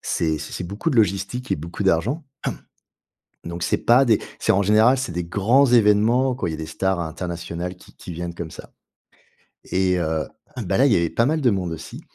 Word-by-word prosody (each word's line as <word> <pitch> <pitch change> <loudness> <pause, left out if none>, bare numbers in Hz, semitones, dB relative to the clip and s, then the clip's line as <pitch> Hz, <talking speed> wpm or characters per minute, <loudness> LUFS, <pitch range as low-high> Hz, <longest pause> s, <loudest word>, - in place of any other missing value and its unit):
c'est 80 -2 -1
c'est - - -8
c'est - - -4
beaucoup 100 - -3
de 135 - -1
logistique 105 +4 0
et - - +1
beaucoup 85 +6 -6
d'argent. 100 - +1 1.2
Donc 85 0 -5
c'est - - +1
pas 125 +3 +4
des 110 -3 +4 0.2
c'est - - +2
en 100 - +3
général, 110 +6 +4
c'est 130 -8 -3
des 90 0 -3
grands 110 +10 +3
événements 120 +2 +4
quand 90 - -3
il - - -2
y - - -4
a - - -5
des 80 - -5
stars 95 +3 -1
internationales 85 +1 -5
qui 90 - -19
qui 90 - -9
viennent 85 +1 -5
comme 85 -2 -6
ça. - - -11 0.9
Et 90 -1 +1
heu, 80 -1 -1 0.4
bah, 95 0 0
là, 135 - +5
il 125 - +4
y - - +4
avait 85 -1 +1
pas 115 - +1
mal 155 +3 +1
de 125 - +4
monde 90 -4 -2
aussi. 80 - -9
95 Hz, 215 wpm, -22 LUFS, 85-120 Hz, 1.2 s, là